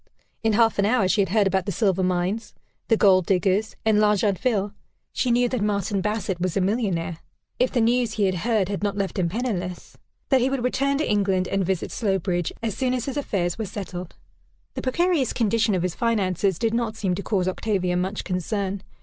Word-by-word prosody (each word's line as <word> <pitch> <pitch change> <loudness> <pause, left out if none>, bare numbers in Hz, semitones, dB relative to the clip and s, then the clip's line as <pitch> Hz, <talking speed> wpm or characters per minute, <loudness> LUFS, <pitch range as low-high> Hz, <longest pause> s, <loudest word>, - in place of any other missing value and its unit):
In 225 -1 +1
half 225 -1 +3
an 200 - +4
hour 220 -4 +3
she 205 +2 +3
had 195 - 0
heard 210 +1 +3
about 190 0 0
the - - 0
silver 190 -1 +1
mines, 185 +4 -1 0.3
the 225 - +3
gold 185 -4 +4
diggers, 195 +3 +1
and 215 -1 +4
L'Argentville; 210 0 +1 0.4
she 255 - 0
knew 245 +1 +3
that 250 -3 -2
Martin 200 -1 0
Bassett 205 -3 -2
was 185 0 -1
a - - +3
millionnaire, 185 -5 -1 0.4
if 250 +1 +2
the 245 - +1
news 235 0 +2
he 215 - 0
had 190 -1 +2
heard 210 +1 0
had 200 -1 -3
not 205 -1 -1
left 195 0 -2
him 170 -2 +1
penniless; 185 -5 -4 0.3
that 265 -2 +4
he 255 - +2
would 270 -3 -2
return 275 +2 +1
to 305 - -1
England, 195 -3 +1
and 195 0 0
visit 185 -1 -2
Slowbridge, 190 -5 -1
as 220 -4 -2
soon 255 -1 0
as 245 - -3
his 270 - -4
affairs 195 -10 -1
were 220 - -1
settled. 185 -3 -7 0.6
The - - -4
precarious 315 0 +1
condition 225 -2 +1
of 180 - -1
his 180 -2 -1
finances 200 -5 0
did 225 +3 0
not 230 -2 -1
seem 190 -4 -1
to 190 - -3
cause 190 -3 0
Octavia 185 -2 -1
much 190 +3 -2
concern. 195 +1 -2
205 Hz, 205 wpm, -24 LUFS, 185-230 Hz, 0.6 s, an